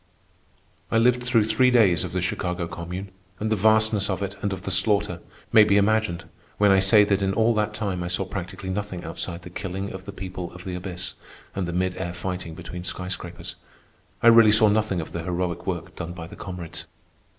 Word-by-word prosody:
I - - +2
lived 125 +2 +3
through 120 -3 +3
three 110 +4 +3
days 105 -9 +4
of 90 - -5
the 90 0 -1
Chicago 90 -1 -2
Commune, 90 +3 -6 0.3
and 110 +1 -2
the - - +4
vastness 110 0 +3
of 95 +1 -1
it 100 0 -4
and 100 - -1
of 95 -2 -5
the - - -3
slaughter 105 -2 +1 0.3
may 110 - +9
be 100 -1 +3
imagined 105 -3 +2 0.3
when 105 -1 +5
I 95 - +6
say 100 +2 +6
that 100 -1 +1
in 95 0 0
all 115 +1 +3
that 105 -1 -1
time 100 -4 -2
I 85 - -3
saw 90 +2 -1
practically 95 0 -5
nothing 100 -2 -4
outside 85 +2 -4
the 90 - -10
killing 95 +1 -4
of 95 0 -8
the 100 - -6
people 90 -2 -6
of 90 0 -10
the 95 - -5
abyss 90 -1 -5 0.4
and 95 -2 -2
the - - -3
mid 90 +1 -1
air 90 -2 -4
fighting 90 -3 -4
between 90 +2 -7
sky 90 0 -3
scrapers. 90 -2 -5 0.7
I - - +6
really 115 -2 +8
saw 110 0 +6
nothing 105 -4 +1
of 80 - -8
the 85 - -4
heroic 90 0 -3
work 85 -4 -4
done 85 +1 -5
by 85 -2 -7
the - - -11
comrades. 90 -3 -7
95 Hz, 215 wpm, -25 LUFS, 90-105 Hz, 0.7 s, may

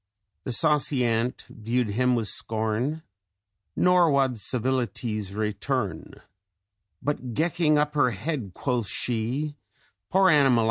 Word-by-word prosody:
The - - -3
saucy 145 -1 +3
ant 115 +2 -1
view'd 115 +1 -2
him 125 +3 +2
wi' 115 - 0
scorn, 110 +8 -1 0.7
Nor 180 -2 +4
wad 135 -4 +1
civilities 115 -3 -1
return; 105 - -3 0.9
But 130 -5 -3
gecking 160 -1 +2
up 150 0 +1
her 145 -4 +3
head, 115 - -4
quoth 125 -5 -1
she, 125 +8 -2 0.5
'Poor 190 0 +4
animal! 135 -5 +4
125 Hz, 110 wpm, -25 LUFS, 110-150 Hz, 0.9 s, Nor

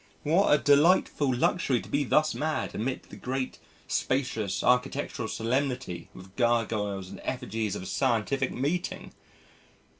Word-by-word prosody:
But 150 - -1
what 195 +4 +4
a 150 - +7
delightful 145 -1 +4
luxury 130 +1 +1
to - - -10
be 145 +1 +1
thus 155 +3 +2
mad 155 +1 -2
amid 125 +4 -2
the - - -13
great, 130 0 -3 0.3
spacious, 115 -7 -1
architectural 125 -1 +1
solemnity 125 -6 -2
with 95 +1 -13
gargoyles 110 -5 0
and - - -9
effigies 110 -5 -2
of - - -5
a - - -8
scientific 125 +7 0
meeting! 160 +8 -2
125 Hz, 140 wpm, -28 LUFS, 110-145 Hz, 0.3 s, a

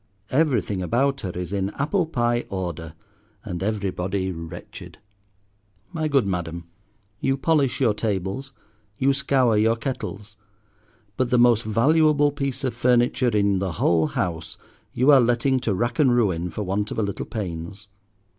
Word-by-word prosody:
Everything 125 - +1
about 135 +9 0
her 95 - -4
is 90 +1 -5
in 100 -1 -1
apple 160 +5 0
pie 120 -5 0
order, 85 -4 -5 0.5
and 90 -5 -5
everybody 95 -2 -2
wretched. 80 -2 -9 1.0
My 160 -2 -1
good 140 -6 +2
Madam, 85 -3 -3 0.6
you 135 +5 0
polish 140 -2 +1
your 120 -6 +3
tables, 105 +5 -3 0.5
you 135 +1 +3
scour 130 -4 +2
your 110 +2 +3
kettles, 110 -4 -6 0.8
but 130 -1 0
the 125 - +3
most 120 -2 +5
valuable 145 +6 +3
piece 140 -2 -3
of 130 - -1
furniture 120 +1 +2
in 100 -3 +2
the 95 -3 -2
whole 80 -1 +2
house 85 0 -3 0.3
you 130 +4 +4
are 135 -2 +7
letting 120 +3 +2
to 115 -4 -1
rack 120 - -2
and 130 -5 +4
ruin 90 -7 +1
for 105 +5 -4
want 100 +2 -2
of - - -6
a 110 - +1
little 100 -1 -4
pains. 95 0 -6
110 Hz, 150 wpm, -23 LUFS, 95-130 Hz, 1.0 s, are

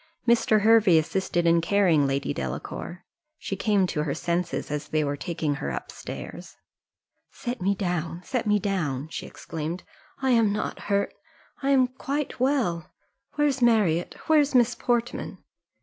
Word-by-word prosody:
Mr. 225 -2 +4
Hervey 215 -5 +6
assisted 175 +1 0
in 170 0 +4
carrying 165 -5 +3
Lady 135 0 -1
Delacour 65 - -5 0.3
she 195 - -4
came 200 -1 +2
to 165 -4 -2
her 150 -2 -2
senses 175 -2 -2
as 150 0 -3
they 155 0 +1
were 145 0 -1
taking 160 -1 -2
her - - -2
up - - -5
stairs. - - -8 0.7
"Set 245 -4 -5
me 200 +2 +2
down, 175 -2 -3
set 245 0 -2
me 210 0 +4
down," 160 -9 -2
she - - -6
exclaimed: 165 +3 -5 0.4
"I 265 -1 +1
am 230 -4 +4
not 210 - -3
hurt 200 0 +1 0.5
I 275 - 0
am 265 -2 +5
quite 275 +3 -4
well, 240 - +1 0.5
Where's 290 -3 +1
Marriott? 210 -8 +3
Where's 295 -3 +3
Miss 245 -1 +5
Portman?" 240 0 -1
195 Hz, 150 wpm, -26 LUFS, 165-240 Hz, 0.7 s, Hervey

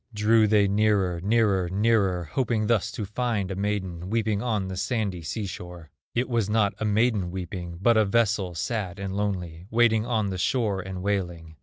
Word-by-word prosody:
Drew 110 +1 +4
they 105 -1 +4
nearer, 100 -4 +1
nearer, 100 -3 +2
nearer, 100 -2 +2
Hoping 110 - -1
thus 105 -2 +1
to 105 - -4
find 105 -2 -2
a - - -3
maiden 95 -3 -3
Weeping 110 -2 0
on 110 -6 -1
the 95 - -5
sandy 100 -3 -2
sea 85 +7 -4
shore. 90 -4 -8 0.2
It 120 +2 +1
was 115 -5 0
not 105 -2 +2
a 110 - -1
maiden 105 -3 +2
weeping, 90 -1 -6
But 115 +4 +4
a 110 - +4
vessel, 100 -4 +1
sad, 95 +1 -3
and 95 -1 -4
lonely, 90 -4 -3
Waiting 115 -1 +3
on 110 -5 0
the 95 - -4
shore 105 -4 0
and 95 0 -6
wailing. 85 -5 -2
100 Hz, 180 wpm, -26 LUFS, 90-110 Hz, 0.2 s, Drew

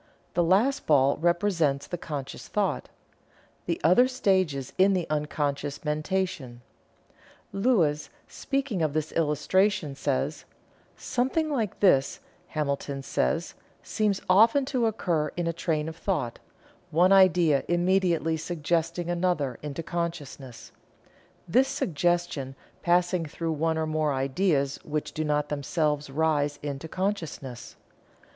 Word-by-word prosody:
The 175 - +2
last 205 +11 +2
ball 140 -2 +4
represents 170 -4 +1
the 175 - -4
conscious 145 -5 -6
thought - - -1 0.8
the - - -1
other 185 +11 +6
stages 190 - 0
in 195 +1 +5
the 180 -3 0
unconscious 145 -1 -2
mentation. 150 -5 -2 0.9
Lewes, 190 -9 +1 0.2
speaking 275 -9 -2
of 155 -3 0
this 155 0 -2
illustration, 165 +2 +1
says: 140 +2 -2 0.5
"Something 285 +6 -1
like 225 -9 -2
this, 140 -9 +3 0.3
Hamilton 140 -2 -3
says, 65 - -1 0.3
seems 210 -3 -1
often 225 +9 +5
to 240 -3 +2
occur 170 -8 0
in 175 - -1
a 170 - -1
train 160 -2 -1
of 160 0 -7
thought, 175 - -2 0.5
one 175 +4 +4
idea 175 -7 +5
immediately 175 -2 +1
suggesting 170 +1 -2
another 175 -7 -1
into 150 +2 -5
consciousness 145 -9 -5 0.8
this 255 +10 +3
suggestion 175 - -1 0.3
passing 175 0 +2
through 165 +1 -4
one 160 +1 0
or 160 - 0
more 155 -2 0
ideas 140 +1 0
which 150 0 -3
do 155 - -2
not 150 -1 0
themselves 150 0 -1
rise 145 0 0
into 145 +1 -5
consciousness. 160 - -4
160 Hz, 120 wpm, -27 LUFS, 145-185 Hz, 0.9 s, other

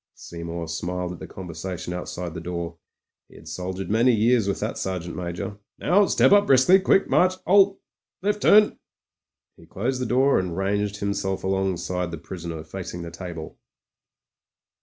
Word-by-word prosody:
Seymour 85 0 -6
smiled 90 +2 -3
at 90 - -8
the - - -8
conversation 90 0 -6
outside 90 -1 -5
the - - -5
door; 85 -1 -5 0.5
he - - -18
had - - -14
soldiered 95 +2 -5
many 115 +4 +4
years 115 -1 +3
with 100 - -1
that - - -3
Sergeant 90 -2 -4
Major. 90 +4 -5 0.2
"Now, 200 +2 +3
step - - +4
up 205 0 +6
briskly. 135 +9 +6
Quick 195 0 +3
march. 185 +1 +3
'Alt 195 +1 +5 0.5
Left 205 +1 0
turn." 210 0 +5 0.8
He - - -17
closed 125 +6 -2
the 125 - -1
door 135 +3 +3
and 90 -2 -3
ranged 100 +1 -1
himself 100 -1 -2
alongside 95 -2 -1
the 85 - -6
prisoner 85 -2 -7
facing 90 +1 -7
the 85 - -7
table. 85 -2 -8
95 Hz, 160 wpm, -24 LUFS, 85-125 Hz, 0.8 s, up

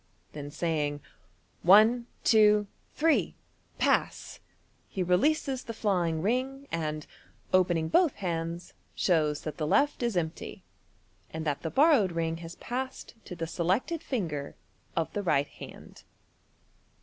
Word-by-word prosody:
Then 145 -1 -6
saying, 150 -2 -1 0.3
" 90 - -38 0.2
One, 220 +6 +6 0.2
two, 210 -2 +5 0.3
three! 320 0 +2 0.4
Pass! - - 0 0.3
" - - -39
he 190 - -3
releases 260 - +1
the 230 - -7
flying 175 -7 0
ring, 265 +5 -1
and, 155 -2 -3 0.5
opening 175 -3 +3
both 320 - +3
hands, 170 -2 -4 0.2
shows 155 -5 +1
that 155 -2 -6
the 155 - -2
left 285 - +2
is 235 -6 0
empty, 160 -2 -4 0.7
and 160 0 -5
that 145 -2 -1
the 160 - -3
borrowed 265 - +4
ring 165 -1 -1
has 165 0 -9
passed 260 +2 -5
to 180 - -7
the 165 -1 -3
selected 190 - -1
finger 160 - -3 0.4
of 165 -1 -1
the 205 - -1
right 145 -7 +1
hand. - - -12
180 Hz, 135 wpm, -29 LUFS, 160-235 Hz, 0.7 s, One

